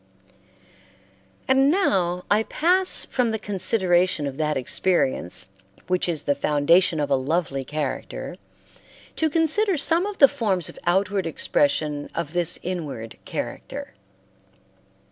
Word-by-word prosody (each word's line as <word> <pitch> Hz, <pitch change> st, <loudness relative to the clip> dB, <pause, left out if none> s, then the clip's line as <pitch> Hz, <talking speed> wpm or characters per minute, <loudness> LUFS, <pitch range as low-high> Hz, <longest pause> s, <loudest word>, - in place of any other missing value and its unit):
And 270 Hz, +1 st, +4 dB
now 185 Hz, -, +1 dB
I 210 Hz, +1 st, +4 dB
pass 365 Hz, +10 st, +1 dB
from 250 Hz, -3 st, 0 dB
the 220 Hz, -, -1 dB
consideration 185 Hz, -5 st, +1 dB
of 140 Hz, -1 st, -5 dB
that 150 Hz, -2 st, 0 dB
experience 130 Hz, -, 0 dB, 0.4 s
which 180 Hz, -1 st, 0 dB
is 160 Hz, -4 st, -2 dB
the 145 Hz, -, +1 dB
foundation 155 Hz, +4 st, +2 dB
of 145 Hz, -1 st, -2 dB
a -, -, +5 dB
lovely 140 Hz, 0 st, -1 dB
character 150 Hz, 0 st, -5 dB, 0.8 s
to 320 Hz, -, +1 dB
consider 330 Hz, +5 st, +1 dB
some 330 Hz, +6 st, +2 dB
of 415 Hz, -1 st, -6 dB
the 275 Hz, -, +8 dB
forms 195 Hz, -, -1 dB
of -, -, -12 dB
outward 190 Hz, 0 st, +1 dB
expression 145 Hz, -1 st, 0 dB
of 170 Hz, -2 st, -4 dB
this 175 Hz, -2 st, +5 dB
inward 150 Hz, -11 st, -5 dB
character. -, -, -6 dB
180 Hz, 125 wpm, -23 LUFS, 150-225 Hz, 0.8 s, the